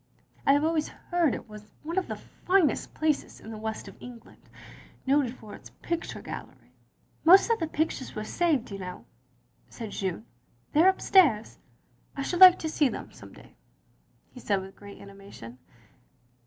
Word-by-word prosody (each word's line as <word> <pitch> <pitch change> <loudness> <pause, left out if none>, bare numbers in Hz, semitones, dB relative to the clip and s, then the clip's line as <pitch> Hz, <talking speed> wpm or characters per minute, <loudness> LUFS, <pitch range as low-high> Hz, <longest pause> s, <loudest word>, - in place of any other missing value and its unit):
"I 275 - +7
have 290 +1 +2
always 315 -1 +1
heard 345 -6 -1
it - - -9
was 210 0 -12
one 330 +3 -5
of 375 - -6
the - - -4
finest 365 -4 0
places 310 -2 -1
in 220 - -10
the 220 - -7
West 220 0 -5
of - - -13
England, 245 -2 -12 0.6
noted 270 -2 +2
for 215 -4 -12
its - - -12
picture 340 -1 -4
gallery. - - -9 0.3
" - - -40
"Most 380 +7 +7
of 460 - +2
the 325 - -1
pictures 310 -4 -3
were 215 - -4
saved, 290 -2 0
you 195 - -6
know," 180 -1 -8 0.6
said 225 -4 -8
Jeanne. 185 - -4 0.5
"They 305 - +5
are 370 - +7
upstairs." 335 - +3 0.3
" - - -31
I 275 - -2
should 350 +5 -2
like 365 -1 +11
to 320 - -4
see 300 -3 +2
them - - -7
some - - -14
day, - - -17 0.4
" - - -39
he 250 - -11
said 200 -5 0
with 190 0 -10
great 200 0 -12
animation. 195 -12 -12
270 Hz, 180 wpm, -27 LUFS, 210-330 Hz, 0.6 s, like